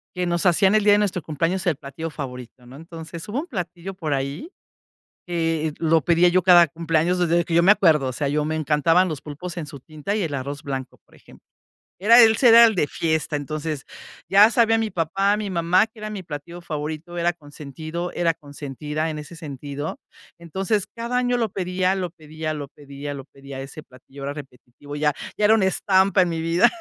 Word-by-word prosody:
que 180 0 -1
nos 170 0 -1
hacían 190 +3 +4
el 215 - +3
día 205 0 +6
de 205 - +4
nuestro 195 -4 -1
cumpleaños 165 +5 -2
el 165 -5 +1
platillo 155 +4 -7
favorito, 125 -4 -8
¿no? 125 +2 -13
Entonces, 165 +1 -9
hubo 235 +6 -2
un 325 - -5
platillo 180 - -6
por 160 -6 -3
ahí, 140 - -3 0.8
que 165 -3 -1
lo 165 0 +2
pedía 175 +1 +4
yo 185 +1 +3
cada 175 -1 +7
cumpleaños 165 +3 0
desde 170 0 +2
que 165 - -5
yo 170 +1 +5
me 195 +4 +7
acuerdo, 155 -9 +3
o 130 - -3
sea, 140 +2 -2
yo 150 +1 0
me 155 +1 -2
encantaban 160 +4 +2
los 155 -4 -5
pulpos 170 +5 -8
en 165 - -4
su 140 -2 -10
tinta 155 +7 -5
y 215 - 0
el 160 -4 -3
arroz 140 +2 -5
blanco, 135 -2 -5
por - - -23
ejemplo. - - -19 0.5
Era 230 +5 +7
ese 225 +2 +5
era 230 +1 +9
el 225 -2 +2
de 170 - +2
fiesta, 160 0 -1
entonces, 150 0 -4 0.5
ya 205 +3 +7
sabía 225 -3 +3
mi 225 -1 -1
papá, 195 +5 +1
mi 210 -1 -4
mamá, 180 +3 +2
que 225 - -27
era 215 0 -6
mi 205 -2 -5
platillo 170 +1 -8
favorito, 155 +1 -5
era 175 +1 +1
consentido, 155 +3 -7
era 170 -2 0
consentida 150 +2 -5
en 155 - -5
ese 150 +3 -9
sentido. 145 -1 -6 0.4
Entonces, 190 +4 -2
cada 235 +2 -2
año 245 0 +1
lo 230 -2 0
pedía, 185 0 -1
lo 180 -3 -3
pedía, 155 -1 -6
lo 145 -2 -6
pedía, 145 0 -8
lo 135 -1 -9
pedía, 140 -1 -11
a - - -5
ese 135 +3 -9
platillo, 135 +1 -15
era 140 +1 -3
repetitivo, 145 0 -11
ya 150 0 +1 0.3
ya 210 - +3
era 220 +1 +6
una 200 - +2
estampa 190 +1 +3
en 180 - +2
mi 165 - -3
vida. 165 +2 +4
165 Hz, 210 wpm, -23 LUFS, 150-185 Hz, 0.8 s, era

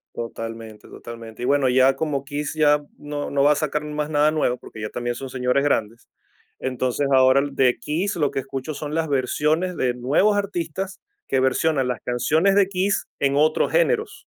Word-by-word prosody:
Totalmente, 115 -1 -7
totalmente. 115 0 -10
Y - - 0
bueno, 140 -1 +3
ya 130 +1 +4
como 140 -2 -2
KISS 145 +2 -4
ya 150 -1 +4 0.2
no 145 0 -5
no 140 0 +1
va 145 - +6
a 150 - +3
sacar 150 -1 -2
más 150 0 -3
nada 150 0 +3
nuevo, 135 -5 0
porque 110 -3 -11
ya 105 - -3
también 120 0 -3
son 135 +1 -7
señores 125 +1 0
grandes, 115 -5 -1 0.5
entonces 130 +2 -1
ahora 130 +1 +5
de 130 -2 +2
KISS 175 +7 -2
lo 150 -4 0
que - - -2
escucho 135 +2 -5
son 150 +1 -5
las 165 -1 0
versiones 150 +6 0
de 125 -1 +1
nuevos 140 +12 +2
artistas 190 -2 -3 0.3
que 135 - +1
versionan 130 +1 +1
las 125 -2 -3
canciones 155 +11 +1
de 200 -2 +4
KISS 195 +1 -1
en 140 0 +1
otros 155 +2 +2
géneros. 475 -3 0
145 Hz, 185 wpm, -23 LUFS, 125-155 Hz, 0.5 s, va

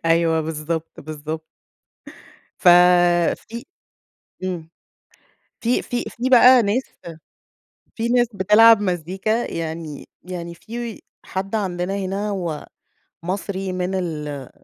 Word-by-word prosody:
أيوه، 165 0 +3
بالضبط، 160 +1 -4
بالضبط. 155 +1 -6 1.1
ف 180 - +4 0.8
في 235 +2 -7 0.8
إمم، 170 -3 -4 0.9
في 240 +2 +1
في 245 0 -3
في 250 +2 -3
بقى 250 0 +8
ناس 215 +6 +1 1.1
في 230 0 -1
ناس 245 -1 +3
بتلعب 210 +3 +6
مزّيكا 190 +5 -1
يعني 160 -2 -5 0.2
يعني 170 -1 -6
في 230 +3 -7 0.3
حد 195 +3 -4
عندنا 185 -2 -2
هنا 195 +2 -2
هو 175 -7 -4 0.6
مصري 190 0 -3
من 185 +1 -2
ال 150 -6 -4
185 Hz, 105 wpm, -21 LUFS, 165-215 Hz, 1.1 s, بقى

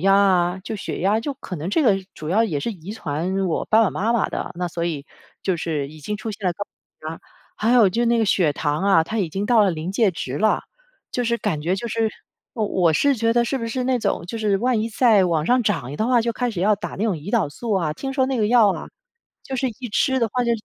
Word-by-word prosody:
压 195 +2 +4
啊， 185 -2 +3
就 220 - -4
血 205 - -5
压 210 +4 +2
就 280 +3 -4
可 190 - -8
能 155 +4 -4
这 300 +11 +2
个 205 -6 +4 0.2
主 155 0 -6
要 220 +5 +3
也 155 -10 -2
是 230 - -2
遗 190 +1 -9
传 185 +1 -2
我 165 - -1
爸 220 +1 +5
爸 210 - +2
妈 220 +4 -1
妈 230 - +1
的， - - -4
那 175 +1 -2
所 170 0 -3
以 150 -4 -3 0.4
就 190 - +1
是 155 -4 -2
已 155 +1 -13
经 210 +8 -3
出 220 +2 -5
现 205 -2 -5
了 180 - +2
高 205 - -4
血 155 - -13
压， - - -10 0.4
还 220 +2 +1
有 235 -5 +6
就 235 +5 0
那 235 0 +3
个 225 - +3
血 180 -7 +2
糖 150 +3 -1
啊， 180 -5 +4
它 220 +5 -3
已 180 -5 0
经 195 +6 -3
到 225 0 +4
了 195 - +3
临 165 +3 -4
界 215 -1 +3
值 140 -5 -5
了， 215 - +2 0.5
就 245 - 0
是 235 0 +1
感 200 -10 -2
觉 170 +5 0
就 235 - -4
是 225 0 0 0.5
我 220 -3 0
我 175 -5 +2
是 280 - +3
觉 230 0 +2
得 240 - +3
是 265 +3 -1
不 230 - -4
是 250 +2 -2
那 255 -1 +1
种， - - -1
就 230 - -5
是 210 -3 +2
万 240 +1 +1
一 225 - -1
再 220 -4 +4
往 160 -3 0
上 245 +7 +3
涨 150 - -1
一 - - -6
的 220 - 0
话 245 -2 +4
就 235 0 -1
开 245 +1 -1
始 195 -6 -4
要 210 +1 +4
打 205 - -6
那 215 - 0
种 215 - +1
胰 160 +6 -7
岛 215 -10 +2
素 225 +9 -4
啊， 170 -6 +1
听 270 - -5
说 265 -1 +3
那 265 - -1
个 215 - +2
药 225 -3 +5
啊， - - -7 0.6
就 265 - -6
是 260 0 0
一 250 - -6
吃 265 +4 +2
的 230 - +2
话 250 +3 0
就 235 - 0
205 Hz, 300 characters per minute, -22 LUFS, 175-230 Hz, 0.6 s, 有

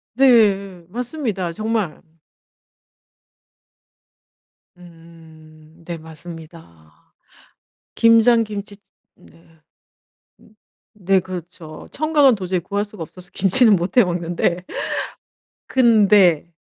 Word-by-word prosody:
네. 200 -8 +3
맞습니다 230 - -4
정말. 215 -4 -3 2.8
음. 165 -2 -18
네 170 -1 -6
맞습니다. 160 - -14 0.8
김장 230 0 +4
김치 205 -1 -7 0.4
네. 165 -1 -23 1.3
네 195 -1 +1
그렇죠. 175 -3 -10
청각은 295 -4 +3
도저히 185 -2 -3
구할 200 +4 -3
수가 205 -4 -10
없어서 180 +3 -11
감치는 205 +3 +5
못 175 +5 -4
해 245 - +7
먹는데 175 0 -2 1.0
근데 205 - +3
185 Hz, 160 characters per minute, -20 LUFS, 165-215 Hz, 2.8 s, 해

